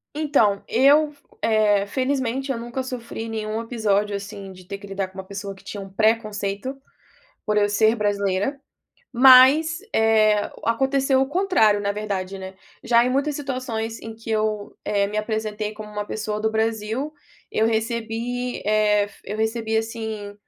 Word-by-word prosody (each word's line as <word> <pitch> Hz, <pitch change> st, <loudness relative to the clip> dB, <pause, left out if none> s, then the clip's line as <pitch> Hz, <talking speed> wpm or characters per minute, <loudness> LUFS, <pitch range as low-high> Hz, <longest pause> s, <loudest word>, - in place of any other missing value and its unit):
Então, 275 Hz, -10 st, +2 dB
eu 290 Hz, +5 st, +4 dB
f 285 Hz, -, -27 dB, 0.2 s
eh, 210 Hz, -2 st, +3 dB
felizmente 265 Hz, +1 st, -1 dB
eu 250 Hz, -, -2 dB
nunca 240 Hz, +3 st, -4 dB
sofri 235 Hz, -3 st, -6 dB
nenhum 220 Hz, 0 st, -3 dB
episódio, 210 Hz, -3 st, 0 dB
assim, 200 Hz, -1 st, -7 dB
de 185 Hz, -1 st, -14 dB
ter 200 Hz, -, -6 dB
que 200 Hz, -, -12 dB
lidar 195 Hz, -1 st, -3 dB
com 190 Hz, +1 st, -17 dB
uma 190 Hz, -, -5 dB
pessoa 200 Hz, +1 st, -7 dB
que 190 Hz, -, -18 dB
tinha 205 Hz, -, -7 dB
uma 195 Hz, -, -9 dB
pré 220 Hz, +3 st, +4 dB
conceito, 210 Hz, +3 st, -5 dB, 0.7 s
por 210 Hz, 0 st, 0 dB
eu 205 Hz, 0 st, +3 dB
ser 220 Hz, +2 st, +3 dB
brasileira, 205 Hz, +3 st, 0 dB, 0.5 s
mas, 265 Hz, +6 st, +7 dB, 0.2 s
eh, 215 Hz, -2 st, +3 dB
o -, -, -3 dB
aconteceu 265 Hz, +2 st, +2 dB
o 270 Hz, -, +2 dB
contrário, 310 Hz, -, +3 dB
na 200 Hz, 0 st, -1 dB
verdade, 195 Hz, -2 st, -4 dB
né. 190 Hz, 0 st, -8 dB, 0.3 s
Já 235 Hz, 0 st, +4 dB
em 250 Hz, -, 0 dB
muitas 280 Hz, +3 st, 0 dB
situações 250 Hz, -5 st, -4 dB
em 225 Hz, 0 st, -8 dB
que 225 Hz, 0 st, -9 dB
eu, 215 Hz, -1 st, -1 dB
eh, 200 Hz, -1 st, +1 dB
me 210 Hz, -, -5 dB
apresentei 215 Hz, -1 st, -3 dB
como 210 Hz, 0 st, -9 dB
uma 210 Hz, 0 st, -3 dB
pessoa 215 Hz, -1 st, -3 dB
do 220 Hz, -, +1 dB
Brasil, 220 Hz, +5 st, -1 dB, 0.4 s
eu 220 Hz, -, +2 dB
recebi, 230 Hz, +2 st, -2 dB
eh, 210 Hz, -1 st, +3 dB
f 200 Hz, -, -14 dB
eu 210 Hz, -, -5 dB
recebi, 220 Hz, 0 st, -1 dB
assim, 220 Hz, -2 st, -4 dB
220 Hz, 170 wpm, -23 LUFS, 205-245 Hz, 0.7 s, mas